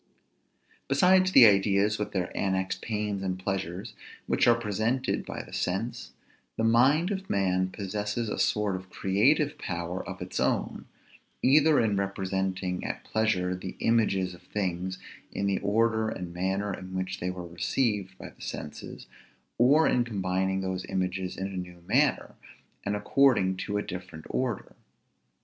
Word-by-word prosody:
Besides 185 +6 +4
the 130 -9 +9
ideas, 100 +1 +3
with 105 - -3
their 90 -2 -3
annexed 95 -1 -1
pains 105 -3 -2
and 95 -1 -2
pleasures, 95 -1 -4 0.3
which - - +2
are 120 0 +5
presented 115 +4 -1
by - - -5
the - - -14
sense; - - -3 0.4
the 115 - 0
mind 135 - +4
of 195 -1 -4
man 95 -1 +1
possesses 105 +4 -3
a - - -3
sort 105 -2 +1
of 95 0 -8
creative 140 +13 +2
power 85 +1 -4
of - - -7
its - - -4
own; - - -1 0.6
either 150 +3 +5
in 105 -4 +2
representing 95 -1 -2
at - - -4
pleasure 105 -5 0
the 90 +1 -7
images 100 -5 +1
of 90 - -14
things 95 -1 -3 0.3
in 100 - -2
the 100 -1 +1
order 110 +1 +1
and 90 -5 -6
manner 95 +3 -1
in 95 0 -8
which 95 0 -3
they 90 - -2
were 90 -1 -5
received 95 +2 -1
by - - -9
the - - -20
senses, 75 - -7 0.5
or 145 +6 +5
in 125 - +3
combining 95 -3 -1
those 95 -1 -3
images 95 -1 -2
in 95 - -3
a - - -3
new 90 -1 -7
manner, - - +2 0.5
and 100 +1 -1
according 105 -3 +3
to 100 +2 -2
a 105 - -1
different 90 -4 -8
order. 125 -6 -2
100 Hz, 155 wpm, -28 LUFS, 95-115 Hz, 0.6 s, the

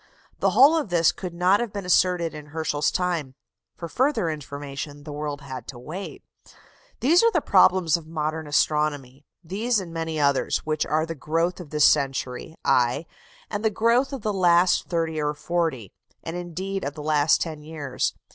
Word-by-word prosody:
The - - +3
whole 280 +5 +6
of 305 -10 -1
this 170 -2 +3
could 180 -2 -7
not 180 +3 +3
have 240 -3 -3
been 200 -2 -5
asserted 180 -2 +2
in 150 -1 -9
Herschel's 150 -1 -1
time: 170 -8 -2 0.4
for 170 - -6
further 250 - +1
information 145 0 -7
the 150 - -8
world 145 -1 -4
had 130 -2 -8
to 130 - -8
wait. 165 +11 -8 0.8
These 325 +7 +5
are 460 - +5
the - - +2
problems 175 -4 +4
of 160 -2 -12
modern 155 0 -3
astronomy 145 -2 0 0.2
these 210 +7 0
and 175 -3 -8
many 160 -1 -3
others, 140 -2 +1
which 155 0 -1
are 155 +1 +1
the 165 - -5
growth 165 +5 -1
of 175 -5 -9
this 150 -1 +3
century, 135 +1 0
aye, 125 +5 +2 0.4
and 205 0 -4
the 220 - +3
growth 235 +6 +2
of 270 -6 -6
the 215 - 0
last 180 -1 +3
thirty 165 -2 -1
or 150 0 -1
forty, 150 - -2 0.3
and 165 - -5
indeed 185 +3 -4
of 140 +1 -4
the 150 - -7
last 150 -1 +3
ten 155 -3 -4
years. 150 -4 -3
160 Hz, 180 wpm, -24 LUFS, 145-180 Hz, 0.8 s, whole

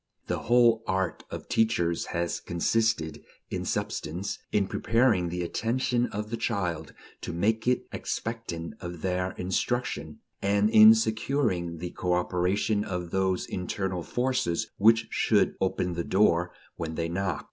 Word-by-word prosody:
The - - -2
whole 120 -1 +4
art 95 -2 -1
of - - -7
teachers 85 -7 +1
has 85 0 -2
consisted, 85 -3 0 0.3
in - - -3
substance, 90 +6 -3
in 100 -2 +2
preparing 110 -3 +2
the 90 +1 -3
attention 120 +5 0
of 105 +2 -5
the 115 - -2
child 100 -8 -2 0.3
to - - -4
make 110 +7 0
it 125 - +2
expectant 110 -7 -4
of 85 -3 -7
their 90 0 -1
instruction, 90 -4 -2 0.2
and 100 +2 +2
in 110 0 +9
securing 110 -6 0
the 85 +2 -5
cooperation 90 +4 0
of 90 -3 -4
those 95 -1 0
internal 95 0 -3
forces 120 - -1
which 115 +2 +5
should - - +2
"open 90 -1 0
the 85 0 -2
door" 90 -3 +2 0.3
when 80 -1 -4
they 85 0 -1
"knock." 90 -1 -2
95 Hz, 135 wpm, -27 LUFS, 85-115 Hz, 0.3 s, in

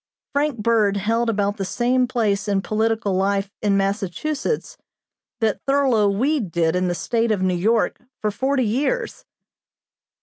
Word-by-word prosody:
Frank 285 -2 0
Bird 210 -2 +2
held 230 +4 0
about 205 -1 0
the 195 - -2
same 250 +5 +1
place 215 -5 0
in 195 -1 0
political 220 -1 0
life 195 +1 0
in 200 -2 +2
Massachusetts, 205 - -2 0.7
that 220 -3 +1
Thurlow 265 -7 +3
Weed 235 - 0
did 165 0 +1
in 180 0 +1
the 175 - -1
State 230 +5 0
of 200 -3 0
New 185 -1 +2
York 215 +6 +1 0.2
for 210 - -1
forty 260 +4 0
years. 285 - -1
215 Hz, 145 wpm, -22 LUFS, 200-245 Hz, 0.7 s, Thurlow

